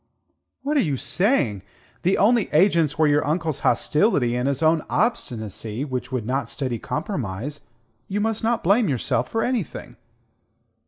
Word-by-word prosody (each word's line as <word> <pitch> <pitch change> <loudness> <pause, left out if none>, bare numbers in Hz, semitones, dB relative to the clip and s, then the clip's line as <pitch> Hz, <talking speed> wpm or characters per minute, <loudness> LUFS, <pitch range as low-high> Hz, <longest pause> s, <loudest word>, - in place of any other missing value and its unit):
"What 295 +2 0
are - - +5
you 145 -5 -1
saying? 160 - +1 0.4
The 185 +3 +2
only 225 +1 +3
agents 165 -3 +3
were 160 - +4
your 145 0 +3
uncle's 155 -1 -1
hostility 130 - +2
and 125 +2 0
his 140 +2 -1
own 160 0 +4
obstinacy 115 - -2
which 130 -2 -4
would 125 -4 -2
not 135 +4 -1
study 130 -5 -3
compromise. 145 - -4 0.5
You 200 - -2
must 220 +1 -1
not 230 0 +1
blame 205 +4 +3
yourself 125 -2 -1
for 225 0 -1
anything." 245 -8 -3
150 Hz, 150 wpm, -23 LUFS, 125-205 Hz, 0.5 s, are